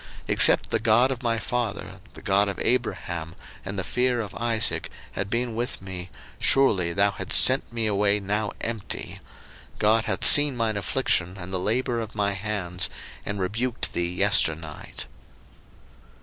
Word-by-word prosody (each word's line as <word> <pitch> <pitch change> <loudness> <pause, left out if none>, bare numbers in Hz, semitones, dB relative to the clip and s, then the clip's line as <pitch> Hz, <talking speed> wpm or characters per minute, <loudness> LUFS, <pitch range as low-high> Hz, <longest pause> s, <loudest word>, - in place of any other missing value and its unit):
01:031:042 - - -16 0.2
Except - - +6
the 110 - +1
God 115 +4 +3
of 130 -1 -5
my 115 -2 0
father, 110 -4 -4 0.2
the - - -13
God 100 0 +2
of 100 - -6
Abraham, 85 -9 -2 0.3
and 100 0 -6
the 95 - -2
fear 125 +5 0
of 105 -4 -5
Isaac, 115 -1 -1 0.2
had 100 - -4
been 120 +1 -1
with 120 +2 -3
me, 95 -2 -7 0.3
surely 100 -11 +3
thou 100 +3 +2
hadst - - +3
sent - - +5
me 115 -1 -1
away 105 0 +1
now 105 +1 -2
empty. 115 -3 -4 0.6
God 110 +1 +2
hath 95 -3 -1
seen 145 -3 +7
mine 110 -2 -1
affliction 100 -4 -1
and 90 0 -9
the 95 - -1
labour 120 +5 -1
of 110 -1 -7
my 100 -1 0
hands, 95 -3 -2 0.4
and 100 0 -3
rebuked 115 +6 -3
thee 85 0 -1
yesternight. 80 -5 0
105 Hz, 160 wpm, -24 LUFS, 95-115 Hz, 0.6 s, seen